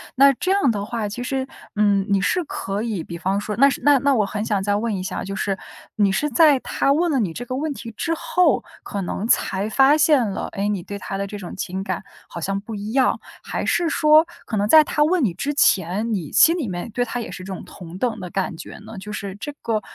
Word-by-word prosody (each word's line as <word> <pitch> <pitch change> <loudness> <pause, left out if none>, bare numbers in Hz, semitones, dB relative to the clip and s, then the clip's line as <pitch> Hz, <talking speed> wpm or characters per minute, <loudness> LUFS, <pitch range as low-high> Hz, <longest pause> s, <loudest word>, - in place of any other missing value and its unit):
那 275 +1 +6
这 365 +8 -2
样 390 -11 +3
的 205 -2 -3
话， 220 -1 -3
其 230 +4 -6
实， 265 0 -2 0.3
嗯， 205 -2 +3
你 200 -1 +3
是 355 - +1
可 200 -6 -4
以 215 -8 -3
比 170 - -8
方 195 +2 0
说 210 0 -4
那 275 +2 +6
是 - - -3
那 285 -2 +6
那 280 0 +2
我 215 - +2
很 210 +1 -3
想 205 -3 0
再 205 0 +1
问 215 0 -1
一 185 - -4
下， - - -4
就 195 +1 -5
是， 200 -2 -1 0.4
你 200 -2 +3
是 295 +10 0
在 290 +1 +5
他 275 - 0
问 335 +2 +1
了 270 - +2
你 190 -7 0
这 245 +9 -6
个 255 - -4
问 300 +2 -2
题 230 -3 -8
之 330 +7 -1
后， 360 +3 +2 0.2
可 200 -2 -4
能 205 +5 -3
才 200 -3 +1
发 270 +5 +5
现 290 -6 +4
了， 195 - -3
诶， 200 +1 -1
你 200 -4 -1
对 200 +3 -7
他 195 - -6
的 200 - -2
这 205 - -7
种 185 -3 -8
情 190 0 -4
感 200 - -3 0.2
好 170 - -8
像 195 +3 -1
不 220 +2 -9
一 210 +2 -5
样。 265 -2 +2 0.2
还 - - -3
是 340 -1 +2
说， 310 0 +5 0.2
可 220 - -4
能 205 +1 +1
在 310 +5 +8
他 295 - +1
问 330 0 +2
你 185 -7 +1
之 275 +11 -3
前， 205 - +2
你 170 -7 -3
心 335 +2 +5
里 280 -9 -2
面 180 +4 -5
对 245 - 0
他 245 +1 -4
也 230 - -5
是 185 - -8
这 190 - -6
种 185 - -7
同 175 0 -10
等 225 -1 -1
的 180 -2 -6
感 190 -2 -2
觉 - - -9
呢？ 220 0 -11
就 205 +2 -8
是 200 -2 -5
这 295 - -5
个 220 -2 -1
215 Hz, 275 characters per minute, -22 LUFS, 195-275 Hz, 0.4 s, 在